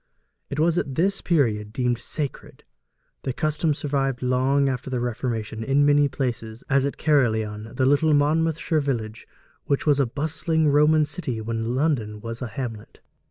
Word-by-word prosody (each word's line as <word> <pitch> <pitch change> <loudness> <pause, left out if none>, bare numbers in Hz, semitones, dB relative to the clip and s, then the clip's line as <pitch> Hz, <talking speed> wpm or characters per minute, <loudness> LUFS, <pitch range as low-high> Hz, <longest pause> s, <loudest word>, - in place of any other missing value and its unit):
It 140 - -4
was 165 +2 +3
at 135 - -4
this 195 +5 +1
period 110 -11 +1
deemed 125 0 0
sacred. 145 0 -5 0.6
The 130 - -3
custom 155 +1 0
survived 135 -3 -1
long 130 +2 +2
after 130 0 -3
the 130 -1 -1
Reformation 115 -2 -3
in 140 +4 +3
many 145 0 +4
places, 120 -4 -4
as 135 0 +3
at 140 - -5
Caerleon, 110 -7 0
the 130 - +2
little 145 +3 +4
Monmouthshire 160 +2 +1
village 115 -6 -3 0.4
which 140 - 0
was 145 -2 +3
a 135 - +3
bustling 160 +3 0
Roman 150 +2 +4
city 145 -8 -4
when 115 +2 -2
London 125 -8 0
was 115 +1 -6
a 125 - -2
hamlet. 115 -2 -7
135 Hz, 160 wpm, -24 LUFS, 115-150 Hz, 0.6 s, many